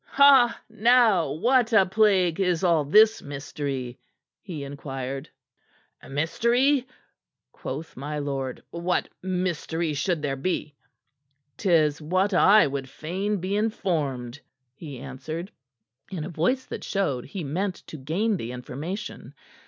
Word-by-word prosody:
"Now 225 - +4
what 240 - +2
a 200 -4 +6
plague 190 -4 +3
is 180 -2 +1
all 170 -4 +3
this 215 +9 +5
mystery?" 140 -3 -5 0.4
he 165 -8 -6
inquired. 135 0 -6 0.8
"Mystery?" 240 - +2 0.6
quoth 150 +5 -7
my 145 +3 -5
lord. 135 -3 -4
"What 170 +1 -1
mystery 175 -3 -2
should 155 +2 -1
there 135 -2 -1
be?" 150 +1 -2 0.8
"'Tis 160 -6 +2
what 185 +6 +1
I 210 +3 +6
would 135 -2 -4
fain 190 +9 -3
be 185 +2 -2
informed," 150 - -1 0.3
he 145 -1 -9
answered 140 - -6 0.6
in 180 -6 -4
a - - -5
voice 190 - 0
that - - -7
showed 145 - -1
he 175 +5 -6
meant 180 +7 -2
to 155 - -9
gain 185 +10 0
the 120 -5 -5
information. 145 - -6
165 Hz, 120 wpm, -25 LUFS, 140-195 Hz, 0.8 s, a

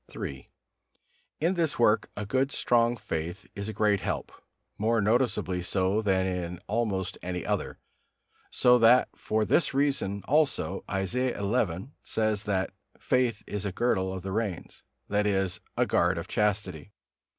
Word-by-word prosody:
III. 65 -1 -6 0.9
In 170 +4 +2
this 165 -5 +1
work 110 -2 +3
a 105 - -3
good 130 +6 +1
strong 120 0 +2
faith 85 +3 -4
is 100 +1 -4
a - - -4
great 105 -3 +2
help, - - -3 0.5
more 115 +2 +2
noticeably 105 -4 +1
so 95 +3 +1
than 95 -3 +2
in 90 -2 -3
almost 100 -4 -1
any 90 -1 -4
other; - - -2 0.7
so 125 0 +4
that 120 +2 +6
for 110 0 0
this 150 +4 +2
reason 135 -9 0
also 140 -9 +1
Isaiah 120 +7 -1
xi. 100 -1 -1
says 110 -1 -1
that 95 -2 -1 0.3
"faith 125 -4 +1
is 105 -1 -4
a 100 - -2
girdle 95 -3 0
of 95 -1 -6
the 95 - -4
reins," 105 -4 -3 0.3
that 105 0 +1
is, 95 -3 0 0.2
a - - +3
guard 90 +1 +2
of 85 +3 -5
chastity. 100 -4 -1
105 Hz, 150 wpm, -28 LUFS, 95-120 Hz, 0.9 s, that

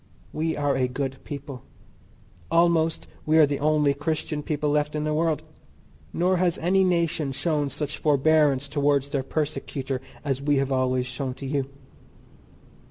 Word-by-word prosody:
We 160 +1 -1
are 145 -1 +1
a 130 -1 +1
good 135 +1 -4
people; 140 -3 -7 0.9
almost 165 -1 +2 0.2
we 155 +1 +3
are 155 - +8
the 140 -1 -2
only 150 -1 +3
Christian 150 +1 -2
people 150 0 -1
left 150 0 0
in 150 - -1
the 155 0 0
world, 160 -1 0 0.7
nor 180 +2 +1
has 175 -1 +1
any 190 +3 +2
nation 170 -5 +1
shown 145 +1 0
such 150 +2 -4
forbearance 145 -1 +3
towards 145 -1 +1
their 140 - 0
persecutor 135 -2 -3 0.2
as 135 -2 -1
we 145 0 +2
have 135 0 0
always 130 -1 +1
shown 130 0 -4
to 140 - -8
you. 135 0 -1
145 Hz, 155 wpm, -25 LUFS, 135-155 Hz, 0.9 s, are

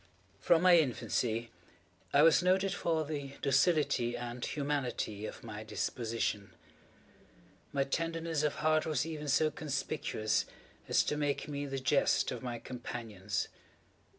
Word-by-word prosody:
From 170 0 +4
my 180 -2 +8
infancy 120 -4 -1 0.6
I 145 - +6
was 165 -1 +6
noted 190 +2 +2
for 165 -3 0
the 145 -2 -5
docility 140 -5 +2
and 120 0 -5
humanity 130 -8 -2
of - - -9
my 110 -2 -7
disposition. 110 -3 -2 1.2
My 140 -1 +1
tenderness 165 +2 -1
of 150 -1 0
heart 155 0 +3
was 150 -2 0
even 155 -2 -5
so 155 +2 +3
conspicuous 140 -8 -1 0.4
as - - +4
to 150 - -1
make 145 -1 -1
me 145 -1 -3
the 135 0 -3
jest 135 +2 +2
of 125 - -5
my 120 -2 -4
companions. 115 -5 -4
140 Hz, 130 wpm, -32 LUFS, 120-155 Hz, 1.2 s, my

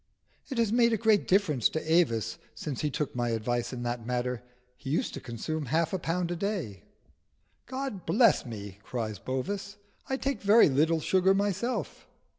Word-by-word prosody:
"It 265 - -4
has 230 -3 +2
made 235 -1 +4
a - - +2
great 220 -2 +3
difference 180 - +3
to 160 0 -2
Avis 115 - +2 0.2
since 140 -5 -4
he 150 - 0
took 145 -1 -3
my 120 -1 0
advice 120 +1 -1
in 125 -2 -5
that 120 -1 -3
matter: 125 0 -2 0.3
he 135 - -8
used 155 - 0
to - - -6
consume 145 +5 -4
half 160 +5 +1
a 190 - 0
pound 170 +1 -1
a - - -1
day." 170 - -3 0.9
"God 260 -8 -5
bless 230 -1 +4
me!" 100 -5 -8
cries 110 -3 -4
Bovis. 195 +10 -4 0.3
"I 265 - 0
take 270 -5 -2
very 205 -1 +6
little 155 +4 +2
sugar 190 +3 +3
myself." 205 +5 -2
160 Hz, 175 wpm, -29 LUFS, 120-200 Hz, 0.9 s, very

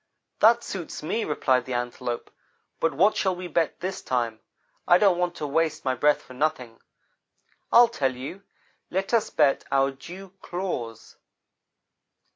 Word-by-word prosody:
"'That 230 +2 +5
suits 175 -8 -6
me,' 220 +9 -1
replied 130 -5 +1
the 130 - -3
Antelope, 120 0 -4 0.5
'but 165 - +2
what 190 +9 +3
shall 190 -2 +1
we 180 0 -6
bet 165 -1 0
this 185 +1 -4
time? 115 -3 -1 0.5
I 175 - +7
don't 190 -3 +3
want 175 -1 0
to 155 - -4
waste 155 +1 0
my 130 - +2
breath 145 +4 +2
for 130 - -13
nothing. 130 -4 -2 0.9
I'll 240 0 +8
tell 135 - -1
you 140 +10 -7 0.5
let 195 +5 -2
us 230 -2 +2
bet 145 -3 +2
our 135 0 +3
dew 180 +7 -11
claws.' 175 - -5
155 Hz, 150 wpm, -25 LUFS, 130-185 Hz, 0.9 s, I'll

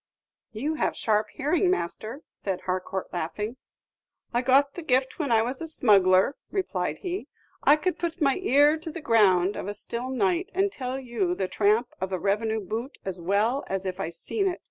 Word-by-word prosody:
"You 260 +8 -2
have 310 - 0
sharp 215 -1 +1
hearing, 320 +6 +1
master," 230 - -2
said 190 -2 -4
Harcourt, 185 +1 -3
laughing. 210 +8 -3 0.8
"I 240 - +2
got 275 +2 +4
the 350 - -6
gift 260 -2 +1
when 285 -6 -1
I 225 -1 +5
was 255 +5 -3
a 325 - -4
smuggler," 200 -5 +4 0.2
replied 385 -2 -1
he. 370 0 -4 0.4
"I 290 - +7
could 360 +4 -2
put 340 0 -3
my 275 -4 +3
ear 295 -3 +4
to 320 +1 -7
the 330 +2 -6
ground 205 - +3
of - - -5
a 205 - -4
still 235 +4 -5
night, 195 -9 0
and 390 +1 +2
tell 260 -3 -4
you 225 -9 -1
the 190 0 -1
tramp 215 +5 +2
of 190 0 -2
a 185 - 0
revenue 220 +4 0
boot 225 +8 -5
as 185 -2 -4
well 210 +9 +1
as 195 0 -3
if 185 -1 -3
I - - -2
seen 390 - -2
it. 360 - -2
235 Hz, 190 wpm, -26 LUFS, 195-290 Hz, 0.8 s, I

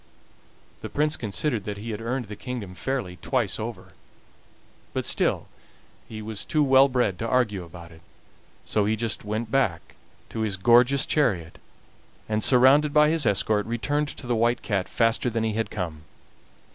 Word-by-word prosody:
The - - -6
Prince 150 +1 +1
considered 115 +2 -2
that 105 -1 -4
he 110 +3 -6
had 105 0 -5
earned 125 +2 -2
the 105 0 -8
kingdom 115 -6 -6
fairly 95 -2 -3
twice - - -1
over - - -6 1.0
but - - -2
still - - 0 0.6
he 110 -1 -7
was 110 -1 -4
too 155 -2 +1
well 135 0 +6
bred 125 -8 0
to 115 - -2
argue 110 -7 +1
about 85 0 -12
it, 80 0 -16 0.6
so 105 -2 +1
he 110 +1 +1
just 110 -1 -3
went 110 +2 -3
back 115 -12 0 0.4
to 115 - -6
his 105 -3 -1
gorgeous 120 +7 +4
chariot, 100 - 0 0.7
and, 110 0 -1
surrounded 140 +4 +5
by 150 0 +6
his 160 -6 +1
escort, 105 +1 +1
returned 120 +6 -1
to 140 - -8
the 120 - 0
White 120 +2 +1
Cat 95 -4 -1
faster 115 +1 +1
than 115 -1 -1
he 110 -1 0
had 110 +1 -2
come. 85 -6 -5
115 Hz, 170 wpm, -25 LUFS, 105-130 Hz, 1.0 s, well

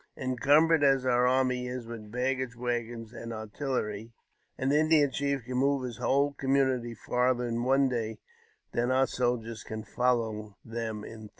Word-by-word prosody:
Encumbered 145 +5 +3
as 135 -2 +4
our 125 -1 +3
army 125 -1 +1
is 125 -1 -5
with 115 -2 -9
baggage 130 0 -1
wag 120 -1 -2
gons 115 -1 -9
and 115 -1 -7
artillery, 110 -1 -3 0.5
an 130 +1 0
Indian 150 -1 +4
chief 140 -1 -1
can 125 0 -3
move 140 0 +2
his 120 -3 -5
whole 140 +1 +2
com 135 -1 0
munity 125 -4 +1
farther 125 +1 +1
in 120 0 -2
one 135 +2 +4
day 115 -3 -2 0.5
than 120 +1 0
our 130 +1 +4
soldiers 120 -3 -2
can 110 0 -6
follow 110 -2 -1
them 115 -2 -4
in 115 - -9
three. 110 -1 -10
125 Hz, 170 wpm, -29 LUFS, 115-135 Hz, 0.5 s, as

